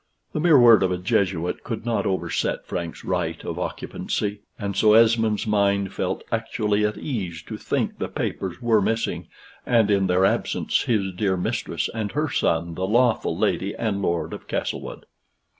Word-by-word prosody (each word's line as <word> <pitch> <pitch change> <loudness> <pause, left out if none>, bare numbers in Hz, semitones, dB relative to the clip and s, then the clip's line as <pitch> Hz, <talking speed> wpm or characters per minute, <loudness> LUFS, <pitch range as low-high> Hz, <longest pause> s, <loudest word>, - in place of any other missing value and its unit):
The - - -1
mere 160 -2 +6
word 120 -4 +7
of 95 -1 +2
a 90 - 0
Jesuit 90 -1 0
could 115 -2 -5
not 115 -1 0
overset 95 -1 -1
Frank's 85 -2 -5
right - - -2
of - - -4
occupancy, 105 0 -3 0.2
and 100 -2 -4
so 105 -1 +5
Esmond's 110 -1 +4
mind 100 -2 +1
felt - - -2
actually 105 -1 0
at 105 0 0
ease 95 - -4
to - - -7
think - - -2
the - - -2
papers 95 +2 -4
were 115 -3 +4
missing, 115 +3 -1 0.4
and 115 -4 +3
in 100 -1 +3
their 90 +1 +3
absence - - 0
his 100 -5 0
dear 95 0 0
mistress 90 - -2
and 110 -2 -3
her 150 -1 -1
son 85 +1 0
the 95 +3 -2
lawful 120 +2 +2
Lady 100 +2 0
and 105 -4 -2
Lord 85 -3 -1
of - - -9
Castlewood. - - -4
100 Hz, 170 wpm, -24 LUFS, 95-115 Hz, 0.4 s, word